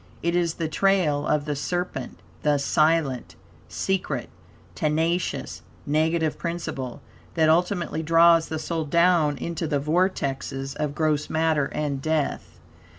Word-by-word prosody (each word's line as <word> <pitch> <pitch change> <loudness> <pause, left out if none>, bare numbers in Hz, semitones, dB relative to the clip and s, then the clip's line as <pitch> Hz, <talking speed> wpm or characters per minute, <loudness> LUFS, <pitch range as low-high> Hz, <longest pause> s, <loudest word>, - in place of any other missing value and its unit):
It 170 +1 +1
is 170 -2 +1
the 165 - -2
trail 160 -4 +1
of 150 -1 +1
the 150 -1 -2
serpent; 175 -3 -4 0.2
the 150 -1 +2
silent, 150 -2 +1 0.3
secret, 190 -1 -2 0.4
tenacious, 165 +3 -1 0.2
negative 160 +1 +1
principle; 165 -7 -4 0.3
that 160 -2 +4
ultimately 170 -1 +1
draws 165 +1 +5
the 160 - -3
soul 160 0 -3
down 170 -2 +3
into 165 +4 -3
the 145 -2 0
vortices 140 -4 -1
of 150 -1 -3
gross 155 -1 0
matter 160 -2 +1
and 140 -1 -3
death. 155 -1 -2
160 Hz, 125 wpm, -25 LUFS, 145-170 Hz, 0.4 s, draws